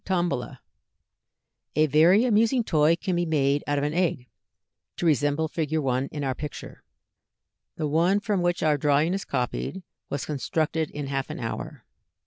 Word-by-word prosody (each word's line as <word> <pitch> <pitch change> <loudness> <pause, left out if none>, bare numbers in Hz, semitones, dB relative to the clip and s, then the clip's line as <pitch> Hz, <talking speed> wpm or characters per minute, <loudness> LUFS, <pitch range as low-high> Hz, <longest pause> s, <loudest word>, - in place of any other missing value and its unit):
2.] 175 -2 0 1.4
A 155 +1 +4
very 165 - +5
amusing 230 +2 +3
toy 155 -4 +3
can 180 +2 -2
be 175 - +1
made 145 -2 +1
out 145 0 0
of 140 - 0
an 150 +1 -1
egg, 165 -8 0 0.7
to - - -2
resemble 145 0 +2
Fig. 160 0 -2
1 135 -2 0
in 145 -1 -4
our 135 -1 0
picture. 150 +2 -8 0.9
The 155 - -2
one 170 +7 +2
from 205 -3 -1
which 175 0 0
our 150 -2 +2
drawing 150 +4 +2
is 195 - -3
copied 135 +8 -3 0.3
was 140 -2 -3
constructed 155 +2 -1
in 145 -1 -5
half 135 -1 -3
an - - -6
hour. 115 -2 -6
155 Hz, 160 wpm, -26 LUFS, 145-175 Hz, 1.4 s, very